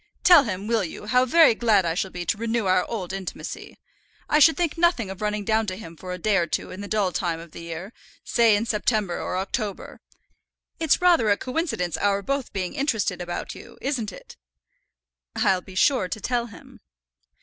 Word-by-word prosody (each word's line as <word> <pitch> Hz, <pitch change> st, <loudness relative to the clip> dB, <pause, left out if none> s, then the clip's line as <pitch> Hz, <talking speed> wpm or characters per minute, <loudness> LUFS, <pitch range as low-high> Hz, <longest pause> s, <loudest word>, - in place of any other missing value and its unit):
Tell 340 Hz, -6 st, +8 dB
him, 195 Hz, -2 st, -4 dB
will 225 Hz, -1 st, +1 dB
you, 180 Hz, +4 st, -7 dB
how 250 Hz, +4 st, +3 dB
very 320 Hz, 0 st, +6 dB
glad 220 Hz, -5 st, +2 dB
I 165 Hz, -, 0 dB
shall 190 Hz, +3 st, -2 dB
be 175 Hz, -1 st, -6 dB
to -, -, 0 dB
renew 230 Hz, -1 st, -1 dB
our 185 Hz, -1 st, +3 dB
old 190 Hz, -5 st, -4 dB
intimacy. 195 Hz, -1 st, -7 dB, 0.5 s
I 300 Hz, -, +3 dB
should 320 Hz, +2 st, +6 dB
think 345 Hz, -4 st, 0 dB
nothing 330 Hz, -, +1 dB
of 190 Hz, -, -9 dB
running 210 Hz, -1 st, -2 dB
down 220 Hz, +1 st, +1 dB
to 185 Hz, -, -3 dB
him 170 Hz, -5 st, -10 dB
for 180 Hz, +3 st, -8 dB
a 180 Hz, -, -4 dB
day 200 Hz, +3 st, +1 dB
or 170 Hz, -2 st, +1 dB
two -, -, -3 dB
in 185 Hz, -, -8 dB
the 205 Hz, -, -6 dB
dull 205 Hz, -3 st, 0 dB
time 170 Hz, -1 st, -2 dB
of 165 Hz, -1 st, -12 dB
the -, -, -10 dB
year, 170 Hz, +5 st, -7 dB, 0.3 s
say 230 Hz, -3 st, +4 dB
in 210 Hz, +3 st, 0 dB
September 210 Hz, -4 st, 0 dB
or 180 Hz, -, -3 dB
October. 200 Hz, +2 st, -4 dB, 0.8 s
It's 325 Hz, +2 st, +2 dB
rather 335 Hz, -12 st, +4 dB
a 200 Hz, -, +3 dB
coincidence 250 Hz, -, -2 dB
our 200 Hz, 0 st, +1 dB
both 275 Hz, +2 st, -2 dB
being 185 Hz, -2 st, -3 dB
interested 225 Hz, -, -1 dB
about 175 Hz, 0 st, -5 dB
you, -, -, -13 dB
isn't 245 Hz, -7 st, -2 dB
it?" -, -, -13 dB, 1.0 s
"I'll 185 Hz, -1 st, +2 dB
be 185 Hz, +1 st, -13 dB
sure 245 Hz, -1 st, +3 dB
to 215 Hz, -, -5 dB
tell 240 Hz, +2 st, -1 dB
him." 220 Hz, -, -15 dB
210 Hz, 205 wpm, -24 LUFS, 185-240 Hz, 1.0 s, Tell